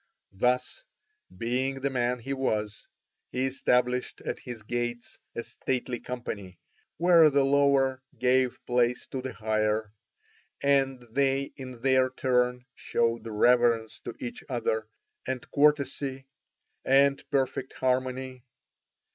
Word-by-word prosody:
Thus, 125 - 0 0.5
being 130 +3 -1
the 140 +1 0
man 125 -1 0
he 135 +3 -4
was, 110 -6 -2 0.4
he 130 +1 -1
established 125 -1 0
at - - -4
his 120 -3 -8
gates 120 +1 -4 0.2
a 115 - -3
stately 125 -1 -3
company, 100 -7 -6 0.4
where 170 -2 +6
the 140 -1 +3
lower 135 -1 +3 0.2
gave 130 0 +1
place 125 0 +1
to 130 - -4
the 130 0 -5
higher, 110 -1 0 0.7
and 135 -2 +2
they 135 +1 +1
in 130 -3 -9
their 130 0 +3
turn 125 -1 0
showed 115 -1 -1
reverence 115 0 +3
to - - -7
each 250 -2 -6
other, 110 -3 -1 0.4
and 130 -1 -3
courtesy, 140 -2 +1 0.6
and 140 +1 +4
perfect 135 -2 -1
harmony. 130 0 -1
125 Hz, 115 wpm, -28 LUFS, 120-135 Hz, 0.7 s, where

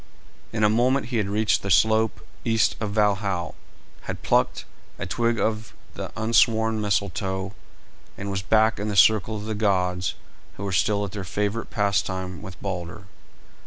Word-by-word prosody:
In 110 -1 -1
a - - +7
moment 120 +3 +2
he 125 - -1
had 105 -3 0
reached 105 +1 +2
the 100 - -4
slope 110 +4 +3 0.2
east 115 -2 +2
of 105 - -2
Valhal, 100 -4 0 0.5
had - - -6
plucked - - +1 0.3
a - - -4
twig 115 -1 0
of 110 0 -2 0.2
the - - -6
unsworn 110 0 +3
Mistletoe, 95 -1 -1 0.6
and 100 0 -4
was 95 -1 -2
back 110 +3 +3
in 105 - -2
the 105 - -2
circle 110 +2 +4
of 105 - -7
the 110 - -2
gods, 90 -4 0 0.4
who 100 - -6
were 100 - -2
still 100 +3 +1
at 100 - -7
their 100 -1 -5
favourite 105 +4 -2
pastime 95 -3 -1
with 95 -3 -10
Balder. 95 +1 -5
105 Hz, 160 wpm, -24 LUFS, 95-110 Hz, 0.6 s, a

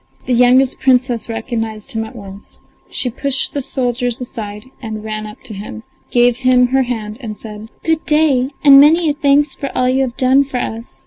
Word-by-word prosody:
The 255 - 0
youngest 250 +2 +3
Princess 250 -3 +1
recognised 225 0 -4
him 225 -3 -2
at 220 - -12
once; 200 -2 -12 0.3
she 250 - -3
pushed 270 +2 -1
the 285 - -2
soldiers 245 -2 -2
aside 225 -1 -8
and 215 -3 -6
ran 215 0 -5
up 210 - -13
to 245 -5 -3
him, 195 - -8 0.3
gave 245 0 +3
him 255 -1 +3
her 265 +1 +2
hand, 225 -3 -4
and 215 -4 -6
said: 215 0 -10
"Good 320 -1 0
day, 295 -4 +2
and 275 -1 +9
many 315 +1 +4
thanks 290 -1 +2
for 275 - -5
all 250 - +2
you 260 +1 +2
have 255 -2 -3
done 265 +2 +4
for 270 -2 -5
us. 230 -1 -5
250 Hz, 190 wpm, -16 LUFS, 225-270 Hz, 0.3 s, and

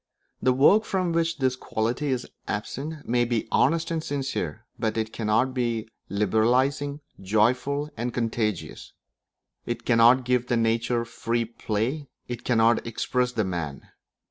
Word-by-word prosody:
The 130 - +4
work 145 +12 +5
from 185 -4 -1
which 165 0 0
this 130 -3 +1
quality 120 +3 -2
is 130 -3 -1 0.2
absent 140 +8 -4
may 120 +1 +2
be 120 -2 -1
honest 165 +3 +2
and 160 -1 -1
sincere, 135 -6 -3
but 110 -1 -1
it 110 0 -2
cannot 115 +4 +1
be 120 -3 -1 0.2
liberalising, 125 +8 +1 0.2
joyful, 125 +9 +1
and 120 +2 -2
contagious; 115 -5 -2 0.7
it 120 0 -3
cannot 120 +2 +5
give 125 -1 +1
the 120 - +1
nature 115 +1 +1
free 115 0 -1
play; 115 +6 -2 0.2
it 120 -1 -5
cannot 115 -1 +3
express 125 +2 -1
the 110 - +1
man. 85 -7 -4
120 Hz, 140 wpm, -26 LUFS, 110-135 Hz, 0.7 s, work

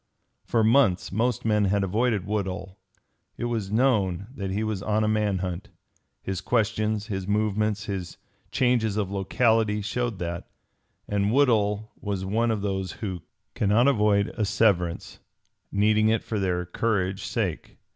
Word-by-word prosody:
For 115 -2 +1
months 110 -5 +3
most 115 +3 0
men 105 -2 +3
had 100 +1 +1
avoided 105 +1 0
Woodhull. 95 -2 -3 0.6
It - - -3
was 110 -5 -2
known 105 -7 +2
that 100 -7 -4
he 100 +3 -1
was 110 -3 -2
on 105 +1 +1
a - - +1
man 105 -2 +1
hunt. 90 +3 -5 0.5
His 95 -1 -3
questions, 110 -1 0
his 95 -4 -4
movements, 105 0 0
his 95 -4 -5 0.3
changes 120 -5 +1
of 100 -2 -1
locality 110 +2 +2
showed 120 +1 -2
that; 85 -1 -5 0.6
and 100 0 0
Woodhull 110 -5 +2
was 100 -4 -3
one 115 +4 +1
of 110 -3 -1
those 95 -3 -2
who 95 -6 -5 0.3
cannot 105 +5 +3
avoid 105 -6 +3
asseverance, 100 -5 +1 0.5
needing 110 +2 +3
it 115 0 +1
for 110 - -3
their 90 -2 0
courage 95 0 -1
sake. - - -3
105 Hz, 145 wpm, -26 LUFS, 95-110 Hz, 0.6 s, months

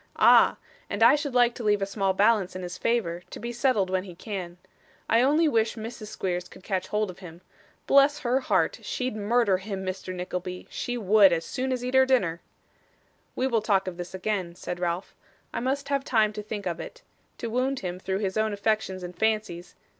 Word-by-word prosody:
'Ah! - - +6 0.3
and 205 +3 0
I 235 - +8
should 290 -3 -1
like 245 -1 +5
to 240 - -7
leave 210 -1 +3
a 195 - 0
small 195 -1 0
balance 200 -1 +2
in 185 - -5
his 180 0 -5
favour, 185 -5 -1
to - - -8
be 235 - -4
settled 230 -7 +1
when 185 0 +1
he 180 -3 -10
can. 180 -3 -6 0.5
I 230 - +4
only 300 +5 +4
wish 225 -5 +1
Mrs. 225 -1 -7
Squeers 180 -4 -3
could - - -15
catch 190 -2 -2
hold 210 -2 -1
of 180 - -16
him. 175 -2 -11 0.4
Bless 280 +2 +4
her 250 0 +1
heart! - - +1
She'd 255 -3 -3
murder 215 -1 +2
him, 190 -1 -5
Mr. 185 0 -4
Nickleby 180 0 -5
she 245 0 -3
would, 205 -2 +5
as 165 -1 0
soon 260 0 -3
as 250 -1 -2
eat 250 - -3
her 265 0 +5
dinner.' 185 -11 +1 0.9
'We 255 - 0
will 235 -4 +1
talk 195 -3 +1
of 180 -2 -5
this 175 +1 -6
again,' 185 -3 -2
said 175 0 -6
Ralph. 175 +1 -2 0.4
'I - - -1
must 275 +3 -2
have 280 -1 0
time 220 -5 +2
to 210 - -5
think 210 -1 -6
of 170 -2 -2
it. - - -9 0.3
To 230 -2 -5
wound 255 +3 0
him 180 -1 -4
through 190 +1 -2
his 190 +2 -2
own 215 -1 +1
affections 205 -3 -1
and 180 0 -7
fancies 215 -6 -1
210 Hz, 210 wpm, -26 LUFS, 185-240 Hz, 0.9 s, I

